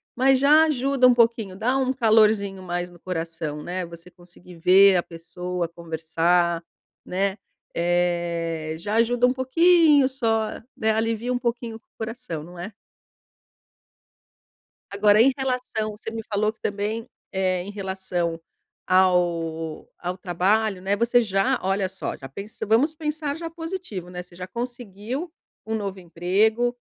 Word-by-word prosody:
Mas 265 +1 +4
já 300 +3 +6
ajuda 275 -3 +3
um 250 - +6
pouquinho, 230 -5 +2
dá 245 +7 +1
um 260 -1 +1
calorzinho 215 -5 +3
mais 175 0 -3
no 175 -1 -17
coração, 165 -4 -4
né, 180 +3 -4
você 170 +1 -12
conseguir 175 0 -16
ver 185 +3 +6
a 175 - +1
pessoa 180 +1 -5
conversar, 170 +1 0 0.4
né. 195 +2 -1 0.4
Eh, 170 -2 0
já 205 +5 -3
ajuda 240 +2 +3
um 250 - +1
pouquinho 300 +1 +5
só, 225 -5 0 0.3
né, 220 - 0
alivia 225 +2 -1
um 250 - +1
pouquinho 235 -1 -3
o - - -10 0.2
coração, 225 -7 -5
não 175 +2 -12
é? 180 +5 -6 2.2
Agora 205 +1 +5
em 270 +3 +6
relação 250 -5 -2
você 220 - -6
me 225 0 -4
falou 215 +1 +1
que 220 - -42
também, 210 +3 -2 0.2
eh, 185 -1 0
em 200 - -7
relação 190 -4 -3 0.5
ao 170 -4 +1
ao 180 +1 -4
trabalho, 195 +2 +1
né, 195 +2 +1
você 235 +3 +3
já 195 -3 +1
Olha 190 0 0
só, 190 - -5
já 135 - -10
pensa 200 - -7
Vamos 255 +9 +3
pensar 300 -2 -3
já 330 +1 -5
positivo, 325 - -6
né. 180 0 -6
Você 180 -1 -19
já 180 +1 -7
conseguiu 240 - -5 0.3
um 220 0 -2
novo 200 -3 -4
emprego, 195 +8 +1
200 Hz, 145 wpm, -24 LUFS, 175-240 Hz, 2.2 s, já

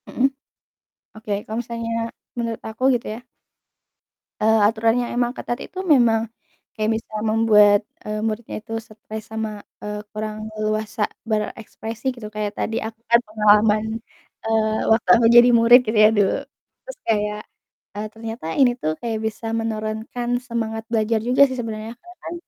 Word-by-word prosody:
Hmm. 260 - +2 0.9
Oke 210 -1 -3
kalau 220 - -5
misalnya 230 -1 -4 0.5
menurut 230 -1 -3
aku 220 +3 -7
gitu, 235 - -4
ya. 245 - -23 1.1
Eee, 220 +1 +4
aturan 225 +1 +2
yang 240 - -4
emang 240 0 +1
ketat 240 +1 -4
itu - - -15
memang 240 -10 +4 0.6
kayak 215 0 0
bisa 220 0 -7 0.2
membuat, 210 -2 +5 0.2
eee, 215 0 -3
muridnya 225 +1 -3
itu 225 - -8
stres 220 0 -9
sama, 220 -1 -4 0.2
eee, 210 0 -4
kurang 215 0 -4
leluasa 215 0 -1 0.3
berekspresi 220 +2 -4
gitu. 230 -3 -8
Kayak 210 -1 -3
tadi 225 - -2
aku 220 0 -6
kan 235 - +7
pengalaman, 210 0 +4 0.6
eee, 220 -1 +1
waktu 220 0 +2
aku 235 - +3
jadi 240 +1 +9
murid 235 +1 +7
gitu, 220 -1 -1
ya, - - +7
dulu. 200 -2 +2 0.5
Terus - - -8
kayak, 210 -1 0 0.6
eee, 215 +1 -3
ternyata, 225 -2 -7
ini 260 -3 +5
tuh 155 -6 -1
kayak 225 -2 -2
bisa 220 +1 -3
menurunkan 220 +2 -3
semangat 225 -3 -3
belajar 225 0 +1
juga 245 +5 +1
sih 260 - -4
sebenarnya. 220 -1 -5
Karena 355 +4 -15
kan - - -5
220 Hz, 150 wpm, -22 LUFS, 215-230 Hz, 1.1 s, jadi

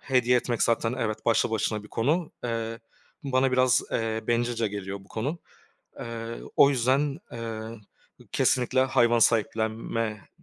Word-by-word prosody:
Hediye 125 -2 +2
etmek 120 -1 0
zaten 115 0 +1
evet, 110 -3 -3
başlı 115 0 +3
başına 110 -1 -1
bir 105 - -13
konu. 150 +11 0
Eee, 115 -1 -3 0.4
bana 135 -2 +1
biraz, 130 -1 +4
eee, 110 -1 -1
bencilce 120 -1 0
geliyor 100 -1 -5
bu - - -22
konu. 140 +10 -3 0.6
Eee, 115 0 -6 0.2
o 140 - +7
yüzden, 135 +3 +1
eee, 115 -2 -5 0.7
kesinlikle 125 +1 +2
hayvan 120 -2 +3
sahiplenme 110 -1 0
115 Hz, 130 wpm, -27 LUFS, 110-125 Hz, 0.7 s, o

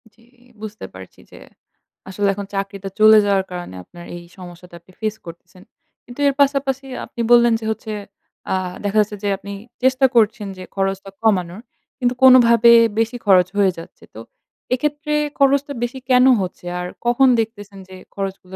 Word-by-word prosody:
জি, 230 - -27 0.4
বুঝতে 215 0 -8
পারছি। - - -13
যে - - -14 0.7
আসলে 200 +1 -1
এখন 200 0 -6
চাকরিটা 195 0 -5
চলে 215 0 +7
যাওয়ার 195 -1 +1
কারণে 175 - -7
আপনার 175 - -14
এই 175 - -10
সমস্যাটা 175 -1 -12
আপনি 185 - -22
ফেস 215 0 -2
করতেছেন। 175 +2 -13 0.4
কিন্তু 245 +3 -13
এর 280 - +2
পাশাপাশি 275 -1 0 0.2
আপনি 235 - -7
বললেন 240 -1 +6
যে 220 - -8
হচ্ছে 220 0 -6 0.6
আ - - +2 0.3
দেখা 205 +2 -1
যাচ্ছে 210 0 -4
যে 205 - 0
আপনি 200 +1 -9 0.3
চেষ্টা 260 +1 +3
করছেন 215 -2 +2
যে 185 - -9
খরচটা 195 0 -2
কমানোর 190 -2 0 0.4
কিন্তু 245 -1 0
কোনভাবে 235 -2 +7 0.3
বেশি 230 +2 -1
খরচ 185 -2 +5
হয়ে 195 -2 +3
যাচ্ছে। 165 - -13
তো - - -9 0.5
এক্ষেত্রে 300 +3 -2 0.3
খরচটা 280 +1 +2
বেশি 240 +2 -4
কেন 250 0 +5 0.2
হচ্ছে? 180 -1 -7
আর 180 - -4 0.2
কখন 245 +3 +3
দেখতেছেন 205 -3 -8
যে 185 - -11 0.2
খরচগুলো 195 -1 -6
210 Hz, 160 wpm, -19 LUFS, 190-245 Hz, 0.7 s, চলে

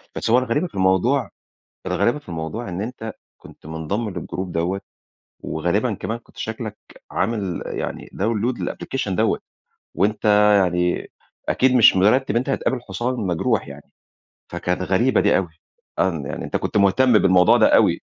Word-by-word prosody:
بس - - -2
هو 120 - +5
الغريبة 130 +8 -1
في - - -18
الموضوع 95 +6 +2 0.6
الغريبة 120 +5 +1
في 145 - -16
الموضوع، 85 +7 -5
إن 90 +2 -4
أنت 110 -1 -6 0.2
كنت - - -16
مُنضَّم 80 +8 -3
للجروب 95 -1 -5
دوَّة، 90 +4 -1 0.6
وغالبًا - - -1
كمان 115 +2 -4
كنت 115 - -23
شكلك 110 -1 -5 0.3
عامل 100 -6 -2
يعني - - -5
داون 105 +1 -1
لود 120 +2 -1
للapplication 130 -7 -4
دوَّة، 90 - +1 0.6
وأنت 105 +2 0 0.4
يعني 90 0 -1 0.4
أكيد 130 0 +3
مش 120 -6 +7
مرتِّب 110 +8 +3
إن 105 - 0
أنت 125 +4 0
هتقابل 130 -1 -1
حُصان 120 +3 -3
مجروح 90 - -1
يعني، 70 +1 -12 0.6
فكانت 90 +1 -2
غريبة 110 +6 +2
دي - - +3
أوي، 95 -3 -2 0.5
آه، 95 - +3
إن 80 -5 -5
يعني - - -5
أنت - - -6
كنت - - -2
مُهتَّم 105 +6 +4
بالموضوع 90 -3 +5
ده - - +5
أوي. - - +3
100 Hz, 160 wpm, -21 LUFS, 90-120 Hz, 0.6 s, مش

